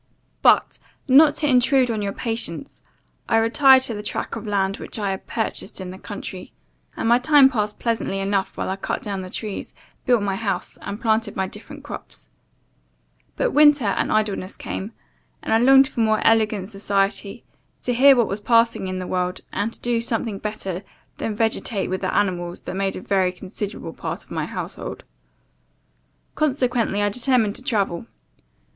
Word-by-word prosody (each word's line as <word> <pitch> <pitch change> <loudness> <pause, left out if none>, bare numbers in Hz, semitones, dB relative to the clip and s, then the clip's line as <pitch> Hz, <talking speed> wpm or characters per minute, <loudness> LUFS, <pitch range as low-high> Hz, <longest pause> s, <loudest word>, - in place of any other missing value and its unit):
"But, - - +4 0.3
not 290 +3 +6
to 300 - 0
intrude 255 -1 +4
on 220 -2 -2
your 200 -1 -2
patience, 225 0 -4 0.5
I 225 - +4
retired 260 +4 +6
to 235 - -2
the 210 - -5
track 210 - -4
of - - -7
land 195 -1 0
which - - -7
I 205 -2 -1
had 190 - -6
purchased 220 - -3
in 185 -1 -6
the 185 - -10
country, 195 -3 -8 0.4
and - - -1
my 240 +1 +5
time 270 0 +6
passed 210 -4 -2
pleasantly 230 -4 -1
enough 195 0 -1
while - - -2
I 190 - -2
cut - - -3
down 200 -2 -3
the 185 - -7
trees, 210 +1 -6 0.3
built 240 -4 +4
my 195 -1 -1
house, 210 -2 -3
and 205 - -6
planted 220 -2 0
my 190 - 0
different 275 +9 -9
crops. 290 - -10 1.1
But - - 0
winter 295 -4 +5
and 200 - 0
idleness 205 -3 -1
came, 200 +4 -5 0.5
and - - -1
I 225 - +5
longed 270 +2 +6
for 270 - -7
more 220 -1 +2
elegant 215 -4 +3
society, 200 +1 -1 0.4
to 245 - 0
hear 270 +3 +7
what 235 -4 +2
was 200 - -3
passing 230 -2 +2
in 185 0 -3
the 185 - -4
world, 180 0 -2
and 205 +3 -1
to - - -11
do 240 -1 0
something 225 -3 -1
better 195 -4 -4 0.4
than 220 - -3
vegetate 220 -2 -1
with 185 - -2
the 185 - -1
animals 175 -3 -1
that - - -6
made 195 0 -1
a - - -6
very 190 -2 +1
considerable 195 +2 -6
part - - -5
of - - -24
my - - -2
household. - - -6 1.3
Consequently, 250 -8 0
I 205 - +2
determined 235 -1 +1
to - - -9
travel. 200 -6 -1
215 Hz, 175 wpm, -22 LUFS, 195-240 Hz, 1.3 s, hear